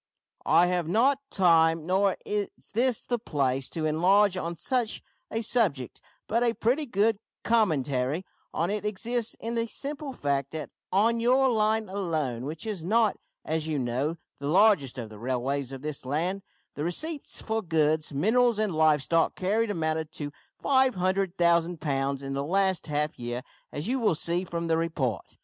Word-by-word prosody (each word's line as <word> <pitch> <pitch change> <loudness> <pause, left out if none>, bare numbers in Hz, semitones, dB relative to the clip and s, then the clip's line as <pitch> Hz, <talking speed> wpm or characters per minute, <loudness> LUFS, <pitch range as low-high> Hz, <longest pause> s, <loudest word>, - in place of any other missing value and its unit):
I 175 - +6
have 175 -2 0
not 255 +9 +3
time, 165 -5 +4
nor 190 +2 +2
is 205 -1 -1 0.3
this 245 +1 +1
the 240 -1 -1
place, 135 - -1
to 160 -2 -3
enlarge 185 +6 +4
on 170 -2 -3
such 245 - -1 0.3
a 225 - -2
subject, 190 - -1 0.3
but 230 +2 +1
a 235 -1 +2
pretty 270 +6 +1
good 210 -1 +2 0.2
commentary 150 - +1 0.3
on 170 +4 -1
it 210 -1 -2
exists 225 +3 -2
in 230 +1 -4
the 230 0 0
simple 285 +4 -4
fact 140 - -2
that 155 -3 -5 0.2
on 225 +5 +3
your 260 +3 +4
line 220 -1 +1
alone, 155 -11 -2
which 155 +6 -6
is 205 -7 -4
not, 220 +4 +3 0.3
as 160 0 -1
you 155 -2 -1
know, 130 +6 -1 0.2
the 140 - -4
largest 155 - +4
of 115 -3 -5
the 105 -1 -12
railways 130 +2 -2
of 135 0 -8
this 150 -2 -4
land, 165 +9 -1 0.3
the 145 - -4
receipts 290 - -4
for 220 0 -2
goods, 155 -3 +1
minerals, 225 - +3
and 215 -4 0
live 155 -2 +3
stock 165 +3 +2
carried 215 +4 0
amounted 160 -4 -1
to 145 -1 -5 0.3
500,000 185 - +2
pounds 140 -2 -1
in 135 0 -4
the 140 0 -1
last 190 +2 +1
half 150 -1 -1
year, 120 +1 -4 0.3
as 145 +6 -4
you 260 +2 0
will 215 -8 +2
see 170 +4 -1
from 170 -1 -3
the 165 -1 +2
report. 140 - -2
175 Hz, 165 wpm, -27 LUFS, 150-220 Hz, 0.3 s, I